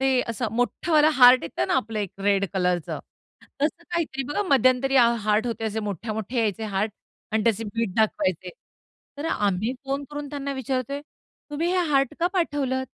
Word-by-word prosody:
ते 265 -1 +3
असं 230 0 -2
मोठावाला 305 +5 +3
हार्ट 250 -1 +8
येतं 150 -6 -2
ना, - - +2
आपलं 220 0 -1
एक 200 -4 -2
रेड 200 0 +2
कलरचं 180 -3 0 0.6
तसं 315 +3 0
काहीतरी 315 -6 -1
बघा. 305 +8 0
मध्यंतरी 265 0 +3
हा 240 -2 +7
हार्ट 215 +3 +1
होते, 225 -1 -3
असे 220 0 -2
मोठे-मोठे 215 +3 -4
यायचे 220 -1 0
हार्ट 210 +1 -1 0.4
आणि 220 -1 +2
त्याचे 225 -1 +1
बीट 220 -2 -3
दाखवायचे. 185 -4 0 0.7
तर 300 - -4
आम्ही 205 +3 0
फोन 275 +1 -2
करून 290 -1 -5
त्यांना 280 -1 -4
विचारतोय, 265 +1 -3 0.5
"तुम्ही 320 +4 -1
हे 370 - +2
हार्ट 275 +1 +2
का 345 - +3
पाठवलत?" 275 -7 0
245 Hz, 165 wpm, -25 LUFS, 210-275 Hz, 0.7 s, हार्ट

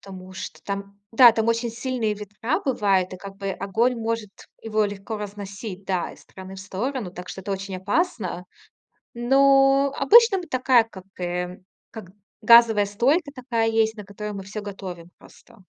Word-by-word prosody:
Потому 185 -1 -11
что 190 - -8
там, 200 0 -6
да, 240 +1 +9
там 225 0 -1
очень 230 0 0
сильные 235 -2 -2
ветра 210 +7 -3
бывают, 195 -8 +1
и - - -6
как 195 +1 -10
бы 195 -1 -4
огонь 200 +6 0
может 225 -2 -3 0.3
его 215 -1 0
легко 205 +2 -5
разносить, 200 -1 -7
да, 185 -2 -2
из - - -17
стороны 190 0 -11
в - - -8
сторону, 200 +2 -4
так 180 0 -9
что 190 - -7
это 200 +1 -4
очень 195 0 -5
опасно. 200 - -2 0.7
Но 270 +2 +4
обычно 445 - +6
мы 355 - -5
такая 255 -2 +3
как, 190 -5 -12 0.2
э, 180 0 -3 0.3
как 215 -6 -10 0.3
газовая 225 -2 +6
стойка 275 - +1
такая 240 -3 -1
есть, 225 0 +1
на 210 - -8
которой 210 +2 -7
мы 195 -1 -6
всё 210 +2 -7
готовим 185 -4 -8
просто. 200 - -19
210 Hz, 170 wpm, -24 LUFS, 195-240 Hz, 0.7 s, да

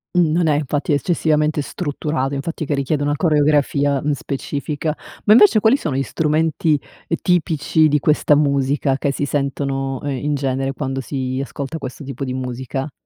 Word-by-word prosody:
Mhmm, 170 -3 +4
non 170 0 +2
è 150 - +3
infatti 145 +1 -1
eccessivamente 150 0 +1
strutturato, 145 -3 -3
infatti, 155 +3 -3
che 145 - -1
richiede 140 +1 -1
una 145 0 +1
coreografia, 145 -3 +2
mhmm, 150 - 0
specifica. 145 +2 -3 0.3
Ma 210 - +4
invece 215 -1 +7
quali 225 +5 +5
sono 150 - -3
gli 135 - +1
strumenti, 155 +1 +1 0.3
ehm, 165 - 0
tipici 160 -3 +2
di 150 0 +2
questa 150 +1 +3
musica 140 -1 +1
che 140 0 0
si 145 - -1
sentono, 135 -1 -2
ehm, 145 - -2 0.2
in 150 0 +1
genere 135 -1 -1
quando 135 -2 -3
si 130 -1 -3
ascolta 140 +3 -5
questo 135 -1 -7
tipo 135 0 -5
di 130 - -3
musica? 130 +2 -4
145 Hz, 170 wpm, -20 LUFS, 135-155 Hz, 0.3 s, invece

